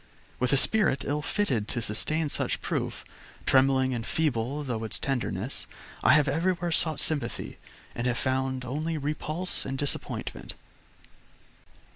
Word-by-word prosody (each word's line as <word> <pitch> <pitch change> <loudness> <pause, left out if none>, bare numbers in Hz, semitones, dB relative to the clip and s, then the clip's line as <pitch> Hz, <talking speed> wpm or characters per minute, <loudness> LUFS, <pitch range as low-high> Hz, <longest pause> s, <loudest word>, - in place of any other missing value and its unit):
With 125 0 +1
a 140 - +5
spirit 190 -4 +4
ill 150 +1 0
fitted 135 - 0
to 120 - 0
sustain 150 +8 0
such - - -1
proof, - - -2 0.4
trembling 130 -1 +4
and 115 -2 -2
feeble 140 0 0
through 120 -5 -3
its 110 - -3
tenderness, 125 -4 -2 0.3
I - - +6
have 150 -2 +5
everywhere 175 +1 +1
sought 160 -1 +1
sympathy 145 -7 -1 0.3
and 120 +1 -2
have 120 -1 +1
found 130 -1 -1
only 155 +6 -2
repulse 155 +4 -1
and 135 0 -3
disappointment. 65 - -2
135 Hz, 135 wpm, -28 LUFS, 125-155 Hz, 0.4 s, I